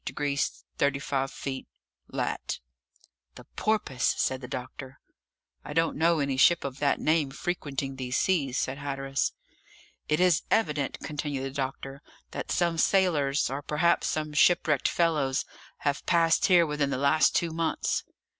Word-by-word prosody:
degrees 140 -1 -2 0.2
35 140 -1 0
minutes 135 -1 -4 0.4
lat..." - - -3 0.8
"The - - -11
Porpoise!" 210 -13 0
said 130 0 0
the 125 - -7
doctor. 130 +1 -7 0.6
"I - - -7
don't 165 +1 +1
know 165 +2 +3
any 140 -3 -1
ship 170 +5 +5
of 135 0 -5
that 145 -1 +1
name 155 -2 +2
frequenting 140 -4 -4
these 130 0 -2
seas," 140 -9 +1
said 135 +2 -2
Hatteras. 135 -1 -2 0.8
"It 150 - +2
is 180 -3 +4
evident," 150 -10 0
continued 145 -2 -3
the 135 - -4
doctor, 135 0 -5 0.3
"that - - -5
some 170 -2 +1
sailors, 155 -8 +2
or 135 +2 -3
perhaps 150 +4 +1
some 155 -1 -2
shipwrecked 150 -2 +3
fellows, 150 -6 +1 0.4
have 140 -1 -1
passed 165 +2 +3
here 175 -3 +6
within 150 -2 -1
the 135 - -1
last 140 +3 +3
two 170 -1 +1
months." 165 0 -1
145 Hz, 145 wpm, -28 LUFS, 135-165 Hz, 0.8 s, here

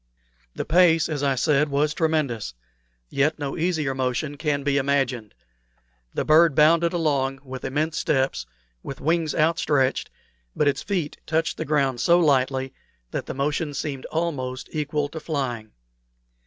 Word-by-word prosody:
The - - -3
pace, 165 -2 +4
as 150 -3 -3
I 140 -2 +1
said, 150 +2 +2
was 145 +2 +1
tremendous, 145 - -1 0.5
yet 145 +3 +1
no 145 -2 -4
easier 160 -5 0
motion 130 +3 -2
can 145 -2 -1
be 140 0 +1
imagined. 135 - 0 0.8
The - - -1
bird 155 -1 +5
bounded 165 +2 +4
along 140 -5 0
with 130 -1 -8
immense 155 +4 -2
leaps, 135 -2 0 0.3
with 135 - -7
wings 160 0 0
outstretched, 150 -4 +1 0.5
but 150 - +2
its 145 - +1
feet 180 -7 -3
touched 160 0 0
the - - -3
ground 135 -4 +1
so 170 0 +5
lightly 135 -4 +1 0.4
that - - -4
the - - -5
motion 145 +2 -1
seemed 135 -2 -4
almost 140 -6 -3
equal 150 -1 -1
to 160 - -7
flying. 130 -8 -3
145 Hz, 145 wpm, -24 LUFS, 135-160 Hz, 0.8 s, bird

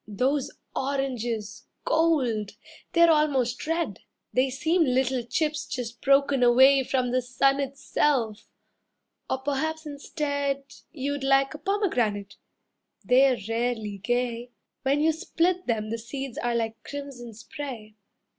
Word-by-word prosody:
Those 255 +7 0 0.3
oranges 240 -6 -3 0.2
Gold! 260 -11 +1 0.4
They're 340 -1 +6
almost 275 -5 +1
red. 330 +1 -1 0.3
They 255 +1 +3
seem 320 +7 +2
little 260 -2 +1
chips 305 +5 -1
just 240 -3 -5
broken 275 -1 +3
away 265 +3 +6
From 255 -1 0
the 255 +1 +2
sun 270 +3 +2
itself. 270 -4 0 0.8
Or - - +1
perhaps 310 +4 -2
instead 285 -1 -2 0.3
You'd 285 -2 -3
like 270 +1 +3
a 300 - -8
pomegranate, 245 - -1 0.7
they're 260 0 +5
rarely 225 -3 -2
gay, 240 +2 -1 0.3
When 275 +2 +1
you 320 +1 +4
split 345 +3 0
them 215 -2 -1
the 230 - -2
seeds 265 +2 -6
are 240 -1 -1
like 225 -1 -2
crimson 270 -5 -8
spray. 225 -1 -8
265 Hz, 120 wpm, -26 LUFS, 240-285 Hz, 0.8 s, They're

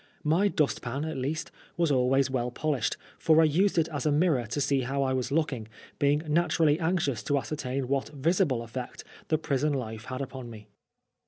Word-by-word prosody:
My 165 +7 +3
dust 150 -7 0
pan, 135 +5 -3
at 160 -1 -4
least, 145 +5 -3 0.3
was 170 -3 +2
always 135 +1 +3
well 125 -2 -1
polished, 140 -1 -1 0.2
for 160 0 +4
I - - +7
used 175 +6 +2
it 165 -1 +3
as 145 -4 -3
a 150 - +2
mirror 145 -6 +2
to 120 +6 -3
see 140 -1 +2
how 135 +2 -1
I 130 -1 0
was 130 0 -2
looking, 140 -8 0 0.3
being 145 +2 +2
naturally 160 -1 +2
anxious 160 - 0
to 145 0 +2
ascertain 135 -2 -3
what 135 +1 -1
visible 150 - +1
effect 120 +2 -7 0.2
the 155 - +2
prison 150 -1 0
life 110 -4 -4
had 130 0 -5
upon 130 -2 -6
me. 105 -2 -12
140 Hz, 190 wpm, -28 LUFS, 130-155 Hz, 0.3 s, I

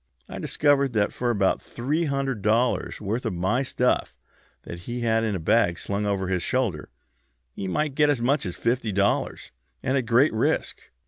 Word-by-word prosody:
I - - -7
discovered 140 -3 +2
that 105 -2 +1
for 125 - -1
about 100 -5 +1
three 150 +8 -2
hundred 135 -5 -2
dollars' 115 +5 +1
worth 110 +4 -2
of - - -2
my 95 +9 +1
stuff 125 -2 0 0.5
that 85 - -8
he 120 +7 -5
had 115 -1 +2
in 110 -3 0
a - - -2
bag 85 0 +2
slung 100 +3 -2
over 95 -2 -1
his 90 -1 0
shoulder 110 - -1 0.6
he 95 - -5
might 150 +9 -1
get 150 +1 +3
as 145 -4 +2
much 135 +5 +1
as 90 - -5
fifty 115 -2 -1
dollars, 100 +1 0 0.3
and 130 - 0
at 120 - -5
great 120 +5 +4
risk. 110 - 0
115 Hz, 185 wpm, -25 LUFS, 100-130 Hz, 0.6 s, great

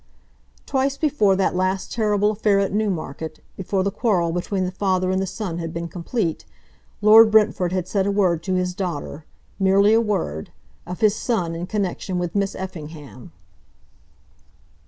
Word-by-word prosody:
Twice 275 0 0
before 260 -11 +2
that 190 -1 0
last 185 +1 -1
terrible 210 -2 +1
affair 210 -1 +2
at 195 -1 0
Newmarket, 160 -7 -3 0.2
before 190 0 -1
the 200 - 0
quarrel 185 -7 +1
between 185 +2 -2
the 180 - -3
father 185 -1 0
and 190 0 0
the 195 - -2
son 185 -3 -4
had 165 -1 -4
been 170 +1 -4
complete, 175 0 -3 0.6
Lord 220 +1 +8
Brentford 210 -5 +3
had 185 -1 -2
said 195 0 0
a - - +1
word 185 -5 +1
to 185 -1 0
his 180 0 -1
daughter, 170 -4 -5 0.3
merely 200 +2 +4
a 225 - +5
word, 180 - -2 0.4
of 180 0 -7
his 215 -1 +4
son 190 -9 -1
in 170 +2 -5
connection 195 -2 -2
with 175 -1 -2
Miss 200 -1 -1
Effingham. 155 - -9
190 Hz, 160 wpm, -22 LUFS, 175-210 Hz, 0.6 s, Lord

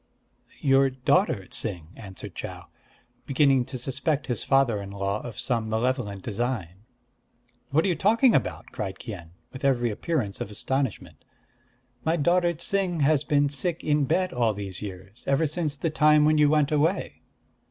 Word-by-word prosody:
"Your 135 -1 +4
daughter 130 - +1
Ts'ing," 90 -6 -4
answered 95 -3 -9
Chau, - - -7 0.6
beginning 135 -2 +3
to 130 - -6
suspect 135 +4 -1
his 125 - -2
father 135 -6 +2
in 100 - -7
law 100 +1 -2
of 115 -3 -8
some 115 -4 -1
malevolent 110 -4 -1
design. 105 -4 -3 0.8
"What 155 +4 +2
are - - +2
you 180 - +1
talking 230 +6 +4
about?" 120 - -1
cried 95 -2 -5
Kien, 95 -8 -8 0.2
with 130 - -9
every 120 -4 +2
appearance 110 - -2
of - - -3
astonishment. 130 +3 -3 0.8
"My 160 +1 +2
daughter 175 +2 +2
Ts'ing 175 0 -1
has 145 0 +3
been 145 -1 +2
sick 165 +4 -2
in 150 -1 +2
bed 185 +7 0
all 115 -4 +1
these 95 -2 -5
years, 100 +2 -9
ever 140 +4 +2
since 155 -1 -2
the 165 +2 -1
time 150 0 +5
when 155 0 +4
you 150 -1 +5
went 150 -1 +2
away." 155 +6 0
135 Hz, 160 wpm, -26 LUFS, 105-155 Hz, 0.8 s, time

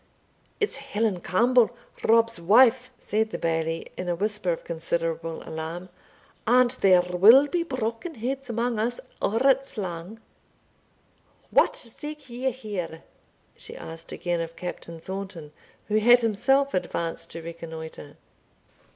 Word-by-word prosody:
"It's 420 -8 0
Helen 225 -8 -1
Campbell, 235 +6 +4 0.3
Rob's 230 -3 +3
wife," 245 +7 +5
said 220 +1 -1
the - - -4
Bailie, 165 0 -2
in 180 -1 -4
a 175 - +1
whisper 210 0 -1
of 165 - -4
considerable 165 -1 -3
alarm; 165 +3 -5 0.6
"and 245 +1 +5
there 190 -7 +4
will 200 +10 +7
be 345 +4 -1
broken 255 +1 -3
heads 260 +3 -4
amang 235 0 -1
us 240 +3 -1 0.2
or 220 +3 +1
it's 270 -1 +2
lang." 185 +2 -5 1.3
"What - - +4
seek 295 +3 -8
ye 250 +2 -1
here?" 200 -10 -6 0.5
she - - -10
asked 165 0 -9
again 175 -1 -2
of 165 0 -6
Captain 170 -1 -7
Thornton, 190 -4 -7 0.4
who 215 0 +2
had 240 +3 +6
himself 245 +6 +2
advanced 170 -2 -2
to 165 0 -7
reconnoitre. 160 -2 -8
210 Hz, 130 wpm, -26 LUFS, 170-245 Hz, 1.3 s, will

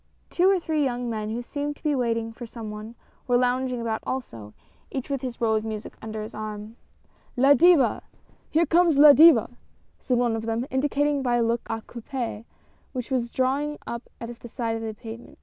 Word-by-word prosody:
Two 360 +2 +4
or 390 -1 +3
three 315 -3 0
young 245 -2 -2
men 215 -1 -3
who 235 +2 -3
seemed 290 +3 -4
to - - -24
be 300 -2 +1
waiting 230 -3 -1
for 240 +1 -8
some 220 -2 -7
one, 215 +2 -8 0.3
were 245 -1 +4
lounging 250 0 0
about 225 -1 -2
also, 115 - -5 0.4
each 270 +1 -5
with 275 -2 -1
his 250 -3 -5
roll 225 -2 +2
of 215 - 0
music 220 -1 -6
under 220 -1 -5
his 215 - -9
arm. 215 +1 -6 0.3
" - - -36
La 280 - +8
Diva! 335 0 +5 0.5
Here 330 +2 +3
comes 335 -1 +3
La 290 0 +10
Diva," 325 +3 +7 0.5
said 250 - 0
one 240 -2 +1
of 225 0 -4
them, 230 +2 -1
indicating 285 +1 +1
by 245 -2 +1
a 240 - +2
look 230 +1 0
a 225 0 -3
coupe 235 -2 -5 0.5
which 255 0 -5
was 245 -2 0
drawing 275 +4 0
up 235 +1 -6
at 230 - -6
the - - -10
side 230 -1 -2
of 225 - -4
the 220 -1 -5
pavement. 225 +2 -10
245 Hz, 205 wpm, -25 LUFS, 225-280 Hz, 0.5 s, La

